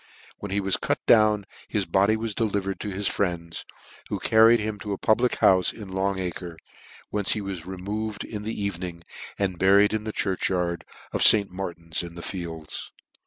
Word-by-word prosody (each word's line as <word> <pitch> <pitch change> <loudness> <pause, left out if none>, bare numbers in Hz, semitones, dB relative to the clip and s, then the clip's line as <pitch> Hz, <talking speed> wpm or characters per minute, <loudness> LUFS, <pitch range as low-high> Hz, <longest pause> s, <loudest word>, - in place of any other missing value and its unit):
When 105 - -6
he 100 +2 0
was 95 -1 +2
cut - - 0
down 105 -2 +5 0.2
his 105 -3 -1
body 100 +4 +3
was 110 -1 -3
delivered 100 -3 -1
to 105 - -4
his 100 +1 -2
friends, 85 -4 -2 0.4
who - - -1
carried 115 +1 +5
him 105 -1 -3
to 105 0 -4
a - - -3
public 120 +5 +2
houfc 95 -2 +4
in 105 -4 -9
Long 95 +1 0
acre, 90 -2 -5 0.5
whence 105 -2 +2
he 110 - -3
was 95 -4 -6
removed 100 +3 -4
in 105 -2 -6
the 105 -1 -4
e.ven 100 -3 -3
ing, 85 -2 -6 0.3
and 95 -3 -1
buried 100 +2 +5
in 110 -1 -1
the 110 - -3
church 95 -3 -1
yard 90 -2 -1 0.3
of - - -1
St. 100 -3 +7
Mar 90 -2 -4
tin 85 0 -23
in 85 -1 -8
the 85 - -8
Fields. 80 -4 -6
100 Hz, 195 wpm, -25 LUFS, 90-105 Hz, 0.5 s, St